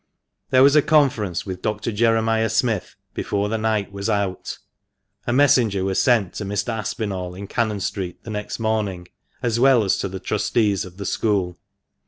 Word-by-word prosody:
There 130 Hz, 0 st, +5 dB
was 140 Hz, +2 st, +6 dB
a 150 Hz, -, +7 dB
conference 125 Hz, -, +2 dB
with 95 Hz, -2 st, -6 dB
Dr. 105 Hz, +1 st, -2 dB
Jeremiah 110 Hz, 0 st, +2 dB
Smith 110 Hz, -4 st, 0 dB, 0.2 s
before 100 Hz, 0 st, -2 dB
the 110 Hz, 0 st, -1 dB
night 110 Hz, -2 st, -1 dB
was 100 Hz, +2 st, -4 dB
out. 100 Hz, -3 st, -2 dB, 0.7 s
A -, -, +1 dB
messenger 120 Hz, -7 st, +3 dB
was 95 Hz, 0 st, +1 dB
sent 115 Hz, -8 st, +2 dB
to -, -, -5 dB
Mr. 100 Hz, +3 st, -2 dB
Aspinall 100 Hz, -4 st, -3 dB
in 100 Hz, +2 st, -7 dB
Cannon 105 Hz, -1 st, -1 dB
Street 90 Hz, -2 st, -4 dB
the 115 Hz, -, -7 dB
next 105 Hz, 0 st, -4 dB
morning, 105 Hz, -5 st, -2 dB, 0.4 s
as 120 Hz, -1 st, 0 dB
well 130 Hz, -3 st, +5 dB
as 95 Hz, -, +1 dB
to 95 Hz, -, -2 dB
the 95 Hz, +1 st, -6 dB
trustees 105 Hz, 0 st, 0 dB
of 90 Hz, 0 st, -13 dB
the 100 Hz, -, -6 dB
school. 95 Hz, -4 st, -1 dB
105 Hz, 175 wpm, -22 LUFS, 95-115 Hz, 0.7 s, a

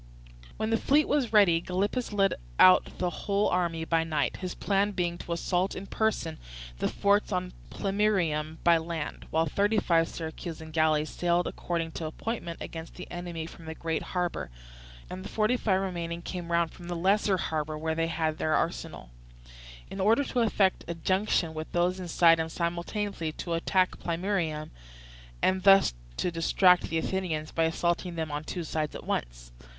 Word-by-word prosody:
When 220 Hz, +1 st, -1 dB
the 225 Hz, -, +4 dB
fleet 300 Hz, +2 st, +3 dB
was 280 Hz, -5 st, +1 dB
ready, 190 Hz, -6 st, +5 dB
Gylippus 200 Hz, +8 st, -1 dB
led 195 Hz, -1 st, +2 dB, 0.2 s
out 185 Hz, 0 st, +6 dB
the 180 Hz, -1 st, -1 dB
whole 200 Hz, +4 st, 0 dB
army 170 Hz, -2 st, 0 dB
by 165 Hz, 0 st, +2 dB
night; 160 Hz, -2 st, -1 dB
his 185 Hz, -1 st, -5 dB
plan 200 Hz, +1 st, +1 dB
being 175 Hz, -2 st, -1 dB
to -, -, -7 dB
assault 180 Hz, +2 st, 0 dB
in 190 Hz, -, -6 dB
person 195 Hz, -7 st, -1 dB, 0.4 s
the -, -, +1 dB
forts 205 Hz, +1 st, +2 dB
on 180 Hz, -1 st, -2 dB, 0.2 s
Plemmyrium 185 Hz, -7 st, 0 dB
by 170 Hz, -1 st, +5 dB
land, 160 Hz, -2 st, -5 dB
while 160 Hz, +1 st, +2 dB
thirty 205 Hz, +7 st, +1 dB
five 165 Hz, -4 st, +3 dB
Syracusan 160 Hz, 0 st, -7 dB
galleys 155 Hz, -1 st, +2 dB
sailed 175 Hz, 0 st, +1 dB
according 165 Hz, -2 st, -3 dB
to 160 Hz, 0 st, -4 dB
appointment 170 Hz, 0 st, -5 dB
against 165 Hz, 0 st, -8 dB
the 180 Hz, -, -8 dB
enemy 175 Hz, -2 st, -5 dB
from 165 Hz, 0 st, -12 dB
the 160 Hz, 0 st, -6 dB
great 165 Hz, -1 st, -2 dB
harbour, 180 Hz, -, -2 dB, 0.6 s
and 185 Hz, +1 st, -7 dB
the -, -, -7 dB
forty 215 Hz, +3 st, +2 dB
five 195 Hz, -6 st, +1 dB
remaining 170 Hz, -3 st, -4 dB
came 175 Hz, -2 st, -5 dB
round 170 Hz, -1 st, +2 dB
from 175 Hz, -, -12 dB
the 175 Hz, -, -3 dB
lesser 195 Hz, +3 st, +2 dB
harbour, 155 Hz, -2 st, -2 dB
where 160 Hz, +1 st, -1 dB
they 165 Hz, 0 st, 0 dB
had 160 Hz, -1 st, -1 dB
their 155 Hz, -, +1 dB
arsenal, 165 Hz, -, -3 dB, 0.8 s
in 195 Hz, -, -4 dB
order 225 Hz, +8 st, +4 dB
to 255 Hz, -, -2 dB
effect 205 Hz, -4 st, +2 dB
a 170 Hz, -, -3 dB
junction 185 Hz, -1 st, +1 dB
with 155 Hz, 0 st, -6 dB
those 180 Hz, +2 st, +1 dB
inside 170 Hz, -2 st, +4 dB
and 160 Hz, 0 st, -2 dB
simultaneously 170 Hz, +1 st, -2 dB
to 170 Hz, -, -4 dB
attack 185 Hz, +2 st, +1 dB
Plemmyrium, 170 Hz, -3 st, -2 dB, 0.7 s
and 185 Hz, 0 st, +3 dB
thus 195 Hz, -, +6 dB, 0.2 s
to 180 Hz, -, 0 dB
distract 180 Hz, +2 st, +4 dB
the 165 Hz, -, 0 dB
Athenians 160 Hz, -3 st, -2 dB
by 165 Hz, -, +1 dB
assaulting 170 Hz, +2 st, -1 dB
them 160 Hz, -2 st, -3 dB
on 145 Hz, +1 st, -3 dB
two 175 Hz, +2 st, -4 dB
sides 155 Hz, -1 st, -3 dB
at -, -, -8 dB
once. -, -, -4 dB
175 Hz, 175 wpm, -28 LUFS, 160-190 Hz, 0.8 s, out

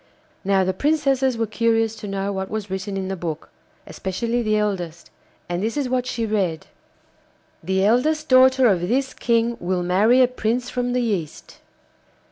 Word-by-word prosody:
Now 195 Hz, 0 st, +2 dB
the 185 Hz, 0 st, 0 dB
Princesses 275 Hz, -1 st, +1 dB
were 225 Hz, -, 0 dB
curious 225 Hz, 0 st, +1 dB
to 210 Hz, -, -7 dB
know 195 Hz, 0 st, -2 dB
what 190 Hz, 0 st, -4 dB
was 210 Hz, -3 st, -5 dB
written 195 Hz, +1 st, -4 dB
in 190 Hz, -1 st, -3 dB
the 195 Hz, -, -3 dB
book, 165 Hz, -3 st, -6 dB, 0.3 s
especially 230 Hz, +6 st, -2 dB
the 215 Hz, -2 st, +1 dB
eldest, 180 Hz, -6 st, -3 dB, 0.4 s
and 175 Hz, +1 st, -2 dB
this 225 Hz, +6 st, -2 dB
is 285 Hz, -3 st, 0 dB
what 250 Hz, 0 st, -1 dB
she 230 Hz, -2 st, -2 dB
read: 190 Hz, -7 st, -1 dB, 1.0 s
'The 190 Hz, +3 st, +1 dB
eldest 305 Hz, +8 st, +2 dB
daughter 260 Hz, 0 st, +5 dB
of 180 Hz, -6 st, +2 dB
this 260 Hz, +4 st, 0 dB
King 235 Hz, 0 st, 0 dB
will 180 Hz, 0 st, -1 dB
marry 205 Hz, +8 st, +3 dB
a -, -, +4 dB
prince 245 Hz, 0 st, -2 dB
from 245 Hz, 0 st, -1 dB
the 250 Hz, -, +1 dB
East. 190 Hz, -10 st, -4 dB
215 Hz, 170 wpm, -22 LUFS, 190-245 Hz, 1.0 s, daughter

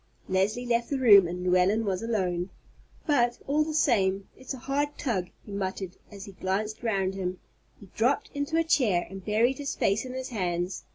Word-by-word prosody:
Leslie 200 Hz, +6 st, 0 dB
left 235 Hz, 0 st, 0 dB
the 280 Hz, -, 0 dB
room, 205 Hz, -8 st, +7 dB
and 180 Hz, +1 st, -5 dB
Llewellyn 185 Hz, +5 st, +3 dB
was 190 Hz, -2 st, -1 dB
alone. 185 Hz, -6 st, -1 dB, 0.6 s
"But, 240 Hz, -5 st, +2 dB
all 295 Hz, +2 st, +2 dB
the 310 Hz, 0 st, -4 dB
same, 200 Hz, -10 st, +2 dB
it's 260 Hz, -, -9 dB
a 265 Hz, -, -3 dB
hard 285 Hz, +4 st, -2 dB
tug," 200 Hz, -10 st, -1 dB, 0.2 s
he 205 Hz, -, -10 dB
muttered 190 Hz, -2 st, -3 dB, 0.2 s
as 200 Hz, -1 st, -9 dB
he 200 Hz, -, -10 dB
glanced 200 Hz, +4 st, -2 dB
round 195 Hz, -5 st, 0 dB
him. 185 Hz, -1 st, -3 dB, 0.4 s
He -, -, -12 dB
dropped 240 Hz, +5 st, +1 dB
into 285 Hz, +2 st, -1 dB
a 330 Hz, -, +4 dB
chair 245 Hz, -, +2 dB
and 195 Hz, -1 st, -8 dB
buried 230 Hz, +6 st, +2 dB
his 285 Hz, -1 st, -3 dB
face 200 Hz, +2 st, +1 dB
in 255 Hz, 0 st, -7 dB
his 260 Hz, 0 st, -4 dB
hands. 180 Hz, -4 st, -2 dB
210 Hz, 190 wpm, -28 LUFS, 190-255 Hz, 0.6 s, room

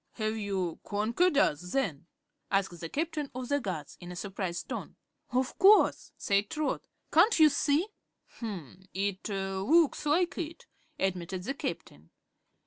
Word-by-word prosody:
Have 215 Hz, -1 st, -1 dB
you 195 Hz, -5 st, -2 dB
conquered 235 Hz, -, +1 dB
us, 180 Hz, -, +2 dB
then?" 175 Hz, -, -1 dB, 0.4 s
asked 195 Hz, -3 st, 0 dB
the 165 Hz, -1 st, -5 dB
Captain 310 Hz, -, -2 dB
of 255 Hz, -1 st, -5 dB
the 285 Hz, 0 st, +2 dB
Guards, 185 Hz, -, -5 dB
in 175 Hz, 0 st, -8 dB
a -, -, -7 dB
surprised 190 Hz, -2 st, -4 dB
tone. -, -, -5 dB, 0.3 s
"Of 255 Hz, +1 st, 0 dB
course," 405 Hz, +3 st, +6 dB
said 200 Hz, +1 st, +1 dB
Trot. 305 Hz, -1 st, -1 dB, 0.3 s
"Can't 465 Hz, -, +6 dB
you 310 Hz, -1 st, +8 dB
see?" 290 Hz, +3 st, +2 dB, 0.6 s
"It 195 Hz, -, -4 dB
looks 200 Hz, -, +2 dB
like 345 Hz, +5 st, +2 dB
it," 330 Hz, -1 st, -5 dB, 0.3 s
admitted 185 Hz, -1 st, -2 dB
the 270 Hz, -, -2 dB
Captain. -, -, -6 dB
205 Hz, 135 wpm, -30 LUFS, 185-290 Hz, 0.6 s, you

